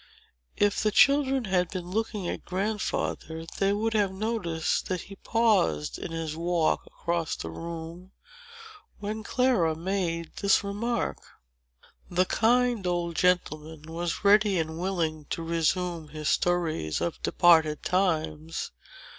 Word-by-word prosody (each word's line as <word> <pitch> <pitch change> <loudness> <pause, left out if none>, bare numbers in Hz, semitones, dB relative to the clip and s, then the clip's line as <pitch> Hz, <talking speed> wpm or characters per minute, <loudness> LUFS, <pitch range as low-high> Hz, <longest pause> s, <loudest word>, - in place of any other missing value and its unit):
If 205 0 +2
the 215 - +3
children 270 +2 +4
had 180 -3 +1
been 185 -2 -5
looking 210 -2 -2
at - - -4
Grandfather, 185 -4 -2
they 195 0 +3
would 220 +2 0
have 205 -3 +2
noticed 190 -6 -1
that 185 -2 -2
he 195 - -11
paused 195 - +1
in - - -5
his 165 -2 -3
walk 170 0 0
across 170 -1 -2
the 80 - -6
room, 170 - -7 0.9
when 210 +2 -4
Clara 220 -10 +2
made 170 -1 -2
this 200 0 +3
remark. 220 +4 -2 0.9
The 180 +1 +2
kind 240 -1 +2
old 175 -1 -1
gentleman 160 -4 0
was 165 +3 -4
ready 205 -1 +5
and 160 0 -2
willing 165 -5 -1
to 165 - -4
resume 170 0 0
his 150 0 -3
stories 165 - 0
of 170 - -3
departed 160 -4 +4
times. 160 -4 -1
175 Hz, 130 wpm, -27 LUFS, 160-205 Hz, 0.9 s, ready